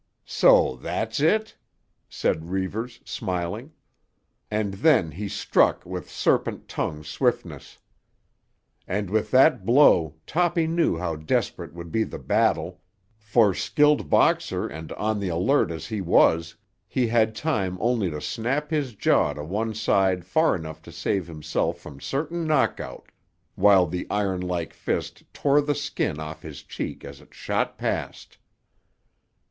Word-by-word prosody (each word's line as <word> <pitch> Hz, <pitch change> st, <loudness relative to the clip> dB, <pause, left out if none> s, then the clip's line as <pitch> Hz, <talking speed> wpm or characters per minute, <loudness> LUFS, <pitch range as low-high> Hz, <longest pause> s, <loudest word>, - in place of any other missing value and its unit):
"So -, -, +4 dB
that's -, -, -2 dB
it?" 220 Hz, 0 st, +2 dB, 0.5 s
said 80 Hz, +2 st, -1 dB
Reivers, 110 Hz, +6 st, -3 dB
smiling; 95 Hz, -, -4 dB, 0.8 s
and 105 Hz, -2 st, -1 dB
then 100 Hz, -, +3 dB
he 100 Hz, +7 st, -5 dB
struck -, -, +2 dB
with -, -, -6 dB
serpent -, -, 0 dB
tongue 75 Hz, 0 st, -3 dB
swiftness. 75 Hz, -1 st, -2 dB, 1.1 s
And 100 Hz, -1 st, -2 dB
with 110 Hz, 0 st, 0 dB
that 135 Hz, +5 st, +5 dB
blow 100 Hz, -, +5 dB
Toppy 175 Hz, 0 st, +1 dB
knew 165 Hz, -, +1 dB
how 85 Hz, -2 st, -3 dB
desperate 80 Hz, +1 st, -2 dB
would 85 Hz, -1 st, -8 dB
be 110 Hz, -, +1 dB
the -, -, -7 dB
battle; -, -, 0 dB, 0.4 s
for, 105 Hz, -1 st, +3 dB
skilled 150 Hz, -, +2 dB
boxer -, -, +2 dB
and 80 Hz, +1 st, -8 dB
on 110 Hz, 0 st, -1 dB
the 100 Hz, -2 st, -2 dB
alert 90 Hz, +7 st, +2 dB
as 80 Hz, -1 st, -6 dB
he 110 Hz, -2 st, -4 dB
was, 85 Hz, -1 st, +3 dB, 0.3 s
he 130 Hz, -, 0 dB
had 110 Hz, -1 st, +2 dB
time 105 Hz, -, -1 dB
only 115 Hz, -5 st, +1 dB
to 75 Hz, -2 st, -5 dB
snap 135 Hz, -, -2 dB
his 140 Hz, -7 st, -1 dB
jaw -, -, +2 dB
to 75 Hz, -, -7 dB
one 105 Hz, +7 st, -3 dB
side 95 Hz, -4 st, +1 dB
far 160 Hz, -, +2 dB
enough 80 Hz, -2 st, -7 dB
to -, -, -13 dB
save 95 Hz, -4 st, -2 dB
himself 75 Hz, -3 st, -2 dB
from 70 Hz, -2 st, -12 dB
certain 160 Hz, +4 st, -3 dB
knockout, 155 Hz, -, -1 dB, 0.4 s
while 95 Hz, -2 st, +5 dB
the 90 Hz, +2 st, -4 dB
iron 100 Hz, -3 st, -1 dB
like 90 Hz, -2 st, -3 dB
fist -, -, -3 dB
tore 145 Hz, +1 st, +2 dB
the 145 Hz, 0 st, -1 dB
skin 140 Hz, -, -2 dB
off 80 Hz, 0 st, -7 dB
his 75 Hz, -3 st, -9 dB
cheek -, -, -6 dB
as -, -, -10 dB
it -, -, -20 dB
shot -, -, -2 dB
past. -, -, -4 dB
105 Hz, 140 wpm, -25 LUFS, 85-135 Hz, 1.1 s, that